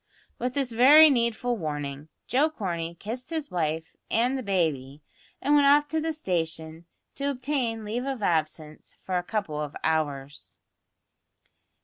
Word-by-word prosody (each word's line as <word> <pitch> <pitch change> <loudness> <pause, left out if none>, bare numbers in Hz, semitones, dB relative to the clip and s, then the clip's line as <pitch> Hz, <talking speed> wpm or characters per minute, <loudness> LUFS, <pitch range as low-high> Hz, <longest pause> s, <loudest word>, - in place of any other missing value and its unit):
With 250 +1 -2
this 270 -3 -1
very 290 +7 +8
needful 235 -1 0
warning, 145 -3 -5 0.2
Joe 285 +5 +2
Corney 170 - -4
kissed 235 - -6
his 320 -3 -4
wife 160 -2 -2
and 245 +4 +2
the 265 - -2
baby, 155 - -1 0.4
and 290 - +1
went 290 -1 +5
off 290 +1 +5
to 315 +1 -1
the 320 +1 -1
station 165 - -3 0.3
to 280 0 -2
obtain 250 -5 -2
leave 235 +5 -3
of 265 -6 -3
absence 155 -3 -2
for 185 -1 -1
a - - -5
couple 180 -7 -3
of 150 -1 -5
hours. 145 -3 -2
210 Hz, 145 wpm, -26 LUFS, 160-265 Hz, 0.4 s, very